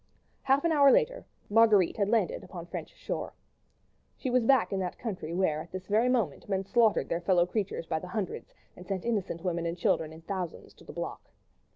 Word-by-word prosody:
Half 275 +1 +2
an 335 - +3
hour 285 -3 +6
later - - +1 0.2
Marguerite 210 -4 +4
had 200 -1 +1
landed 235 - +1
upon - - -8
French - - -6
shore. - - -5 0.8
She 260 - -3
was 245 -2 +2
back 265 -6 +4
in 195 - 0
that 185 -1 -3
country 190 -9 -5
where 170 -4 +1
at - - -12
this 185 0 -6
very 220 +5 +2
moment 215 - -1
men 195 -1 0
slaughtered 230 0 +3
their 170 - -2
fellow 175 -1 +3
creatures 195 -2 -3
by 160 -1 -1
the 180 - -8
hundreds, 190 +1 -4 0.2
and 180 - -12
sent 195 -3 -3
innocent 200 -7 -2
women 170 -2 -1
and 170 +1 -3
children 160 -2 +1
in 160 +1 -12
thousands 180 0 -5
to - - -18
the - - -10
block. - - -6
195 Hz, 205 wpm, -29 LUFS, 175-235 Hz, 0.8 s, hour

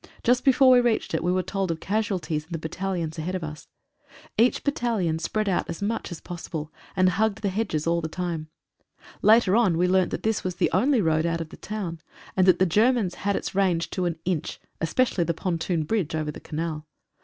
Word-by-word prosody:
Just 245 +1 +3
before 265 -1 +6
we 250 -1 +7
reached 235 -7 0
it 160 - 0
we 175 - +2
were 185 0 +1
told 195 -1 -2
of 165 -1 -2
casualties 190 -7 -1
in 170 - -25
the - - -1
battalions 165 0 -3
ahead 180 +4 -3
of 180 - -3
us. 155 -1 -7 0.7
Each 235 +3 +3
battalion 225 - 0
spread 215 +5 -1
out 190 - 0
as 170 - -4
much 210 0 -2
as 170 - -6
posible, 160 -3 -6 0.2
and 185 -1 +4
hugged 215 +3 +1
the 200 - +2
hedges 185 -6 -1
all 170 0 +1
the 160 - -2
time. 165 -2 -4 0.7
Later 215 -3 +5
on 205 -8 +3
we 180 +2 +3
learnt 185 0 +3
that - - -4
this 220 0 0
was 185 -1 -3
the - - +1
only 245 +5 +3
road 160 0 +2
out 165 0 -1
of 165 -1 -5
the - - -10
town, 190 -6 -5 0.4
and 185 -1 +3
that 180 -2 +6
the 185 - +3
Germans 215 +1 +2
had 200 0 -1
its - - -3
range 185 -4 +1
to 185 - -1
an 170 -2 -1
inch, 175 -4 -2 0.2
especially 185 +2 +1
the 170 0 -1
pontoon 170 -1 -1
bridge 175 -3 -1
over 155 -1 -2
the - - -10
canal. 155 -1 -4
180 Hz, 215 wpm, -25 LUFS, 165-210 Hz, 0.7 s, we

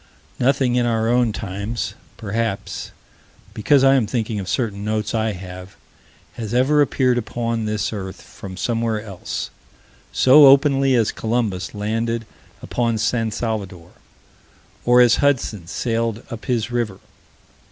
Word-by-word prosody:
Nothing 130 -1 +2
in 120 -1 +2
our 115 -1 +1
own 120 -1 +3
times 100 +2 -4 0.2
perhaps 110 -1 -3 0.6
because 135 +6 +3
I 135 0 +6
am 125 -6 +2
thinking 110 -2 -2
of 95 -2 -5
certain 100 -2 -2
notes 110 0 -2
I 110 -1 0
have 90 0 -9 0.6
has 115 0 -5
ever 145 +4 +4
appeared 130 -3 +2
upon 115 0 -3
this 105 +1 -2
earth, 95 -3 -6
from 95 -1 -10
somewhere 115 +2 -1
else, 100 -4 -6 0.6
so 140 +2 +7
openly 135 -1 +5
as 115 -3 +2
Columbus 110 -5 -2
landed 115 +2 -2 0.4
upon 115 -2 -1
San 115 +1 0
Salvador, 100 -6 -4 0.9
or 125 +1 +6
as 120 -1 +5
Hudson 115 - 0
sailed 115 +4 -2
up 115 -1 -7
his 120 -2 -1
river. 115 -5 -2
115 Hz, 130 wpm, -21 LUFS, 105-120 Hz, 0.9 s, so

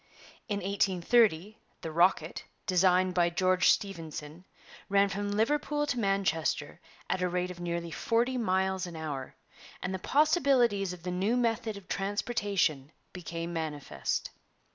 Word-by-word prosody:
In 205 -3 -2
1830 195 +1 +2 0.2
the 160 - -5
'Rocket,' 170 -1 +2 0.2
designed 185 0 +3
by 175 -1 +3
George 185 +1 +3
Stephenson, 165 -3 -2 0.4
ran 200 0 +4
from 205 +1 -3
Liverpool 295 +8 +1
to 260 -4 -1
Manchester 175 -6 0 0.3
at 185 - -1
a 180 - +1
rate 180 +1 -1
of 175 - -10
nearly 170 -1 -3
forty 235 +8 0
miles 190 -4 0
an 170 - -8
hour, 145 -5 -5 0.4
and 185 - -3
the 190 - -3
possibilities 265 - +3
of 180 -2 -9
the 180 - -3
new 195 +7 +1
method 230 -3 0
of 200 - -13
transportation 200 - -1 0.2
became 170 -1 -5
manifest. 150 - -3
185 Hz, 135 wpm, -30 LUFS, 170-205 Hz, 0.4 s, ran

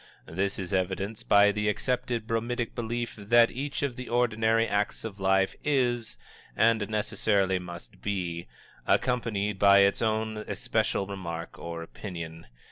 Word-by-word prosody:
This 95 +5 -2
is 95 0 -4
evidenced 95 +3 -2
by 100 0 +7
the 105 +1 0
accepted 120 +1 -1
bromidic 115 +1 -2
belief 120 0 -3
that 115 +3 +4
each 140 +2 -3
of 135 -4 -1
the 125 - -7
ordinary 115 -1 +2
acts 105 0 -1
of 105 -3 -7
life 95 0 +2
is, 125 -6 0 0.4
and 110 -1 +3
necessarily 100 -3 +1
must 85 -8 -10
be, 90 -6 -3 0.4
accompanied 105 -5 +1
by 100 0 +7
its 100 0 +3
own 110 -1 0
especial 105 -2 -1
remark 85 -4 -6
or 85 0 -5
opinion. 80 -3 -8
105 Hz, 135 wpm, -28 LUFS, 95-115 Hz, 0.4 s, by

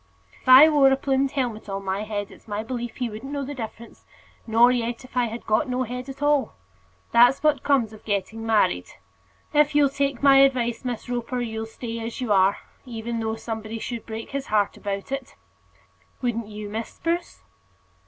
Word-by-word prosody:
"If - - -5
I 260 +4 +10
wore 285 -3 +5
a - - +5
plumed 270 0 0
helmet 240 -6 -2
on 195 0 -4
my 190 +1 -1
head, 205 -2 -4
it's - - -17
my 210 0 -3
belief 240 0 -5
he 250 - -2
wouldn't 225 +5 -8
know 285 -1 -3
the 290 - -5
difference; 230 -2 -8 0.4
nor 230 +2 +5
yet 240 0 -2
if 255 - -17
I 250 -1 +3
had 230 +1 -6
got 215 +4 +1
no 250 +1 0
head 250 +2 -6
at 275 +2 -7
all. 290 -2 +2 0.6
That's 245 +4 +5
what 300 -4 +3
comes 250 -7 +1
of 215 - -14
getting 210 +2 -2
married. 210 - +2 0.7
If 300 0 +3
you'll 290 -1 +5
take 275 -1 -2
my 275 -1 +7
advice, 255 -4 +3
Miss 245 -3 -4
Roper, 245 +1 -3
you'll 220 -1 -4
stay 230 +1 -6
as 230 +1 -5
you 245 -5 +1
are; 190 0 +4 0.3
even 235 -2 -5
though 220 0 -2
somebody 225 0 -5
should 235 0 -6
break 225 0 -6
his 275 -1 -4
heart 210 -2 +1
about 200 +3 -5
it. 275 -2 -5 0.8
Wouldn't 235 -3 -2
you, 210 0 -7
Miss 220 +2 -4
Spruce?" 340 +1 -3
235 Hz, 195 wpm, -24 LUFS, 220-270 Hz, 0.8 s, I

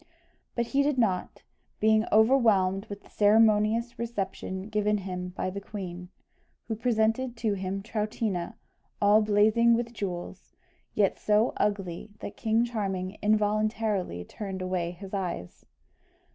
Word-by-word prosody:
But 235 - 0
he 275 +4 +1
did 285 -1 +1
not, 200 -7 0 0.4
being 220 +1 +4
overwhelmed 215 -4 +4
with 205 -1 -8
the - - -19
ceremonious 220 +2 +3
reception 195 -4 -4
given 210 -1 +1
him 180 -2 -5
by 185 - -1
the 200 +1 -6
queen, 180 -3 -7 0.6
who 225 - -2
presented 230 +2 0
to 225 -2 0
him 195 0 -3
Troutina, 210 -4 -2 0.4
all 205 +1 +5
blazing 215 +3 +4
with 235 0 -3
jewels, 185 -3 -6 0.4
yet 200 -2 +2
so 215 +3 +2
ugly 195 -2 -2
that - - -7
King 225 0 +1
Charming 195 -4 -3
involuntarily 215 - 0
turned 190 -3 -6
away 180 -2 -1
his 190 +3 -10
eyes. 175 - -4
210 Hz, 130 wpm, -28 LUFS, 190-225 Hz, 0.6 s, all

